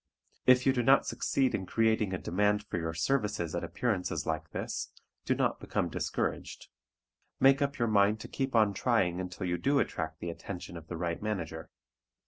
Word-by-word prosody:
If 125 Hz, 0 st, +6 dB
you 135 Hz, -, +5 dB
do 125 Hz, -, +1 dB
not 135 Hz, +3 st, +5 dB
succeed 135 Hz, -2 st, 0 dB
in 95 Hz, -, -2 dB
creating 110 Hz, -3 st, +2 dB
a 95 Hz, -, -1 dB
demand 105 Hz, +4 st, +1 dB
for 95 Hz, -4 st, -4 dB
your 80 Hz, 0 st, -3 dB
services 105 Hz, -, 0 dB
at -, -, -2 dB
appearances 105 Hz, -7 st, -1 dB
like -, -, -2 dB
this, -, -, -4 dB, 0.3 s
do -, -, +2 dB
not -, -, 0 dB
become -, -, -1 dB
discouraged; -, -, -3 dB, 0.7 s
make 135 Hz, +2 st, +5 dB
up 140 Hz, 0 st, 0 dB
your 120 Hz, -, +1 dB
mind 105 Hz, 0 st, +3 dB
to -, -, -7 dB
keep 135 Hz, -2 st, -3 dB
on 105 Hz, -3 st, +4 dB
trying 95 Hz, -5 st, +1 dB
until 90 Hz, +1 st, -5 dB
you 90 Hz, -1 st, -1 dB
do 140 Hz, +1 st, +2 dB
attract 80 Hz, -10 st, -2 dB
the 85 Hz, -, -4 dB
attention 90 Hz, +1 st, -7 dB
of 80 Hz, -1 st, -9 dB
the 85 Hz, -, -5 dB
right 85 Hz, 0 st, -2 dB
manager. 85 Hz, -7 st, -4 dB
105 Hz, 185 wpm, -30 LUFS, 85-125 Hz, 0.7 s, If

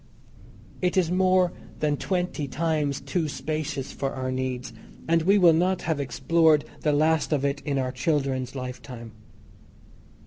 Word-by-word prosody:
It 180 Hz, +1 st, +1 dB
is 175 Hz, -2 st, +2 dB
more 185 Hz, -1 st, +3 dB, 0.3 s
than 150 Hz, -1 st, +1 dB
twenty 180 Hz, -3 st, -2 dB
times 145 Hz, 0 st, -1 dB
too 170 Hz, -4 st, -1 dB
spacious 150 Hz, -1 st, -3 dB
for 135 Hz, -1 st, -3 dB
our 130 Hz, -1 st, -3 dB
needs, 130 Hz, -2 st, -3 dB, 0.3 s
and 165 Hz, 0 st, +3 dB
we 195 Hz, +5 st, +4 dB
will 175 Hz, -4 st, +6 dB
not 180 Hz, +3 st, +1 dB
have 160 Hz, -3 st, -1 dB
explored 150 Hz, +3 st, +3 dB
the 150 Hz, -, +1 dB
last 155 Hz, +2 st, +2 dB
of 140 Hz, -2 st, +1 dB
it 140 Hz, 0 st, -1 dB
in 145 Hz, -2 st, 0 dB
our 130 Hz, -1 st, -1 dB
children's 135 Hz, -2 st, -1 dB
lifetime. 125 Hz, -2 st, -7 dB
150 Hz, 145 wpm, -26 LUFS, 135-165 Hz, 0.3 s, will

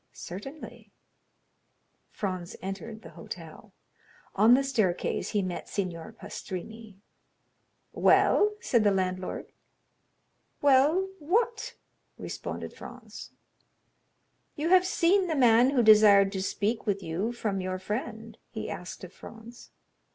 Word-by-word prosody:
"Certainly." 270 Hz, -, -9 dB, 1.2 s
Franz 185 Hz, -4 st, -5 dB
entered 215 Hz, +4 st, -7 dB
the -, -, -11 dB
hotel. -, -, -10 dB, 0.6 s
On 220 Hz, +5 st, +6 dB
the 275 Hz, -, +2 dB
staircase 215 Hz, -10 st, -1 dB
he 205 Hz, -2 st, 0 dB
met 180 Hz, -1 st, -5 dB
Signor 185 Hz, 0 st, -4 dB
Pastrini. 220 Hz, 0 st, -8 dB, 1.0 s
"Well?" 420 Hz, 0 st, +4 dB
said 235 Hz, -, +2 dB
the 205 Hz, -, +5 dB
landlord. 185 Hz, -1 st, -2 dB, 1.1 s
"Well—what?" 370 Hz, -, +1 dB, 0.4 s
responded -, -, -6 dB
Franz. -, -, -11 dB, 1.3 s
"You 305 Hz, +3 st, -2 dB
have 370 Hz, 0 st, +5 dB
seen 375 Hz, +1 st, +2 dB
the 320 Hz, -, -1 dB
man 245 Hz, -1 st, +5 dB
who 265 Hz, -4 st, +2 dB
desired 210 Hz, -2 st, +7 dB
to 190 Hz, -2 st, -3 dB
speak 210 Hz, +4 st, -2 dB
with 200 Hz, -1 st, -1 dB
you 180 Hz, +8 st, -2 dB
from 210 Hz, -5 st, -3 dB
your 185 Hz, 0 st, -3 dB
friend?" 220 Hz, +2 st, -6 dB
he 220 Hz, -, -6 dB
asked 180 Hz, +2 st, -8 dB
of 185 Hz, -, -10 dB
Franz. 230 Hz, +1 st, -13 dB
220 Hz, 110 wpm, -28 LUFS, 195-270 Hz, 1.3 s, desired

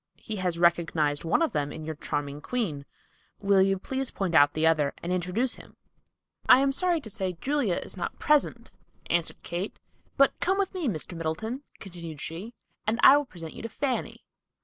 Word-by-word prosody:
He 215 Hz, -, -6 dB
has 180 Hz, -3 st, -1 dB
recognized 165 Hz, -4 st, +2 dB
one 165 Hz, -, +2 dB
of 320 Hz, -, 0 dB
them 145 Hz, -4 st, -1 dB
in 155 Hz, 0 st, -7 dB
your 160 Hz, -, -3 dB
charming 145 Hz, -1 st, -4 dB
queen. 160 Hz, -, -3 dB, 0.5 s
Will 200 Hz, -1 st, +4 dB
you 195 Hz, 0 st, +3 dB
please 265 Hz, +7 st, -3 dB
point 190 Hz, -4 st, -3 dB
out 145 Hz, -2 st, +6 dB
the 155 Hz, +1 st, +2 dB
other 155 Hz, -3 st, +2 dB
and 175 Hz, -, -2 dB
introduce 185 Hz, +8 st, 0 dB
him?" -, -, -19 dB, 0.7 s
"I 255 Hz, -, +9 dB
am 275 Hz, 0 st, +3 dB
sorry 350 Hz, +4 st, +1 dB
to 220 Hz, -, -9 dB
say 185 Hz, -3 st, -3 dB
Julia 275 Hz, -10 st, +1 dB
is -, -, -4 dB
not 175 Hz, -, -4 dB
present," 275 Hz, -6 st, +1 dB, 0.4 s
answered 170 Hz, -1 st, 0 dB
Kate. 175 Hz, +4 st, -4 dB, 0.4 s
"But 275 Hz, -1 st, +5 dB
come 380 Hz, +2 st, +1 dB
with 395 Hz, -2 st, 0 dB
me, 360 Hz, -6 st, -2 dB
Mr. 175 Hz, -3 st, -3 dB
Middleton," 215 Hz, -, -3 dB, 0.2 s
continued 170 Hz, -5 st, -9 dB
she, 185 Hz, +11 st, -6 dB, 0.3 s
"and 225 Hz, +2 st, +1 dB
I 270 Hz, -, +10 dB
will 290 Hz, 0 st, +2 dB
present 165 Hz, -9 st, -8 dB
you -, -, -9 dB
to 230 Hz, -, -5 dB
Fanny." 265 Hz, +1 st, -3 dB
185 Hz, 190 wpm, -27 LUFS, 160-250 Hz, 0.7 s, I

